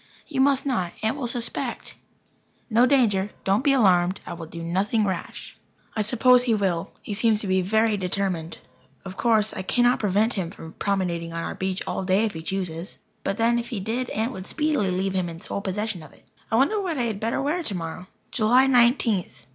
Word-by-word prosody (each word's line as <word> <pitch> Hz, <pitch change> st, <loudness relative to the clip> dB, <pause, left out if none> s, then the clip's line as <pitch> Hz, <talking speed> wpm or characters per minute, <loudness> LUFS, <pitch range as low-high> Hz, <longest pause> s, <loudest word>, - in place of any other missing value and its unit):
"You 270 Hz, -4 st, -1 dB
must 275 Hz, 0 st, +3 dB
not. 185 Hz, -11 st, -1 dB
Aunt 220 Hz, +3 st, +1 dB
will 275 Hz, -4 st, -3 dB
suspect." 235 Hz, 0 st, -3 dB, 0.8 s
"No 235 Hz, +3 st, +5 dB
danger. 215 Hz, -8 st, +3 dB
Don't 195 Hz, +5 st, +2 dB
be 280 Hz, -, +4 dB
alarmed. 185 Hz, -7 st, +3 dB
I -, -, -6 dB
will 165 Hz, -1 st, -8 dB
do 170 Hz, +1 st, -8 dB
nothing 200 Hz, +6 st, +1 dB
rash." 190 Hz, -3 st, -5 dB, 0.4 s
I 215 Hz, -, +1 dB
suppose 245 Hz, +4 st, +5 dB
he 230 Hz, -3 st, +3 dB
will. 185 Hz, -5 st, -1 dB
He 210 Hz, -, -5 dB
seems 215 Hz, +1 st, +3 dB
to -, -, -5 dB
be 190 Hz, -1 st, +2 dB
very 220 Hz, +3 st, +2 dB
determined. 180 Hz, -3 st, -2 dB, 0.5 s
Of 190 Hz, -1 st, -7 dB
course, 220 Hz, -1 st, +2 dB
I -, -, -4 dB
cannot 245 Hz, +6 st, +3 dB
prevent 210 Hz, +3 st, +2 dB
him 185 Hz, -5 st, -2 dB
from 160 Hz, -2 st, -11 dB
promenading 175 Hz, -4 st, -2 dB
on 165 Hz, 0 st, -3 dB
our -, -, -4 dB
beach 190 Hz, 0 st, -3 dB
all -, -, -3 dB
day 190 Hz, +4 st, +2 dB
if 215 Hz, -, -3 dB
he 160 Hz, -, -6 dB
chooses. 175 Hz, 0 st, -4 dB, 0.3 s
But 195 Hz, -, -2 dB
then 235 Hz, +1 st, +2 dB
if 235 Hz, -, -5 dB
he 235 Hz, -6 st, -3 dB
did, 235 Hz, +6 st, -2 dB
Aunt 225 Hz, +4 st, -1 dB
would 190 Hz, -5 st, -8 dB
speedily 300 Hz, -10 st, 0 dB
leave 190 Hz, +1 st, -1 dB
him 185 Hz, -2 st, -1 dB
in 165 Hz, 0 st, -8 dB
sole 200 Hz, -, -5 dB
possession 205 Hz, -1 st, -3 dB
of 155 Hz, -, -13 dB
it. -, -, -23 dB, 0.2 s
I -, -, +1 dB
wonder 290 Hz, -, +3 dB
what 350 Hz, -6 st, -2 dB
I 250 Hz, -, 0 dB
had 220 Hz, -4 st, -2 dB
better 225 Hz, +2 st, -1 dB
wear 300 Hz, +6 st, 0 dB
tomorrow. 180 Hz, -, -5 dB, 0.2 s
July 245 Hz, +4 st, +4 dB
Nineteenth. 240 Hz, -6 st, +2 dB
210 Hz, 205 wpm, -24 LUFS, 185-240 Hz, 0.8 s, No